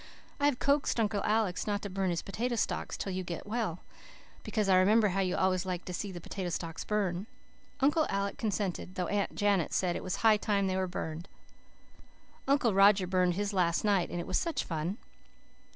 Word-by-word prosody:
I 285 - +2
have 285 -4 +1
coaxed 280 -3 +1
Uncle 210 -2 0
Alec 210 -4 +1
not 205 -1 -1
to - - -2
burn 190 0 0
his 170 -1 -2
potato 235 +5 -2
stalks 225 - -2
till 195 - -3
you 185 0 -2
are 170 - -4
well, 210 -5 -3 0.6
because 215 -3 -1
I 190 -1 +5
remember 210 +3 +4
how 195 +1 -1
you 185 -2 +1
always 185 -1 +1
liked 185 -2 -4
to 180 - -5
see 200 +3 -4
the 175 - -7
potato 185 +1 -5
stalks 165 -1 -4
burn. 200 -2 -1 0.5
Uncle 295 +3 +3
Alec 200 0 -1
consented, 195 -4 -2
though 180 - -1
Aunt 205 +2 -1
Janet 200 -5 +1
said 180 -2 +1
it - - -3
was 185 - -2
high 220 -2 +4
time 200 -1 0
they 190 -1 0
were 190 0 0
burned. 170 -1 -5 1.2
Uncle 275 -6 +3
Roger 195 0 +6
burned 180 -1 +2
his 205 +1 -2
last 175 -3 +1
night 200 -4 +2
and 175 - -4
it 170 - -4
was 185 - +1
such 335 -2 -1
fun. 165 +4 -3
195 Hz, 200 wpm, -31 LUFS, 180-210 Hz, 1.2 s, Roger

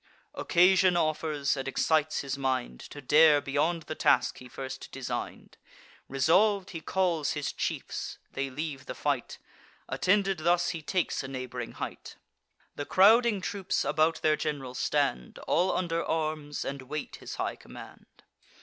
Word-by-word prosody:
Occasion 180 0 +4
offers, 155 -3 0
and 135 -1 -4
excites 155 +3 +1
his 140 -1 -3
mind 130 - -2
To 145 - -10
dare 150 +2 +6
beyond 155 +4 0
the 155 - -5
task - - +2
he 125 - -12
first 130 +1 -7
design'd. - - -6 0.5
Resolv'd, 185 +9 +3
he 165 -3 -6
calls 175 -4 0
his 150 -2 -3
chiefs; - - -4
they 135 0 -3
leave 140 0 -5
the 125 - -5
fight: 140 -5 -2 0.5
Attended 195 -1 +1
thus, 175 +2 +2
he 165 -2 -4
takes 180 +3 -1
a 135 - -6
neighb'ring 125 -2 -6
height; - - -7 0.6
The 145 - -4
crowding 215 +2 +5
troops 195 0 -2
about 155 +3 +1
their 155 -1 +4
gen'ral 145 -4 -4
stand, 60 - -1
All 180 +3 +2
under 170 -2 -1
arms, 155 -2 -2
and 140 0 -4
wait 145 +3 -6
his - - -8
high - - -2
command. - - -14
155 Hz, 145 wpm, -29 LUFS, 135-175 Hz, 0.6 s, dare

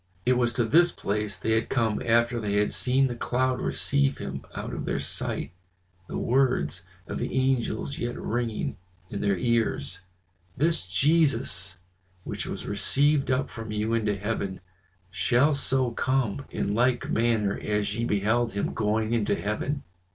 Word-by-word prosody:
It 125 - +4
was 120 -1 +2
to 120 -1 +1
this 170 +9 +5
place 105 -1 -2
they 110 - -2
had 110 0 +1
come 115 -4 +1
after 120 +1 +2
they 105 -2 -2
had 105 0 +2
seen 130 +2 +2
the 125 - -1
cloud 130 +2 0
receive 140 -1 +1
him - - -5
out - - -5
of - - -4
their - - -1
sight, - - -2 0.6
the - - -4
words 120 - +1 0.2
of - - -5
the 120 - -2
angels 130 +1 0
yet 120 0 -3
ringing 115 -1 -2 0.3
in 100 - -3
their 100 -2 +2
ears: 95 -6 0 0.6
"This 160 - +1
Jesus 100 - +1 0.5
which - - -5
was - - -5
received 145 -1 +2
up 130 +1 +1
from 115 -1 -7
you 105 +2 -1
into 105 -3 +1
heaven, 100 -2 -3 0.5
shall 120 +9 +3
so 130 -3 +1
come 130 0 0
in 100 - -2
like 120 +2 +1
manner 110 -3 +2
as 105 -1 -1
ye 115 - -1
beheld 110 +2 +1
him 100 - -1
going 110 +1 0
into 105 -3 +1
heaven." 105 +9 -2
115 Hz, 160 wpm, -27 LUFS, 105-130 Hz, 0.6 s, this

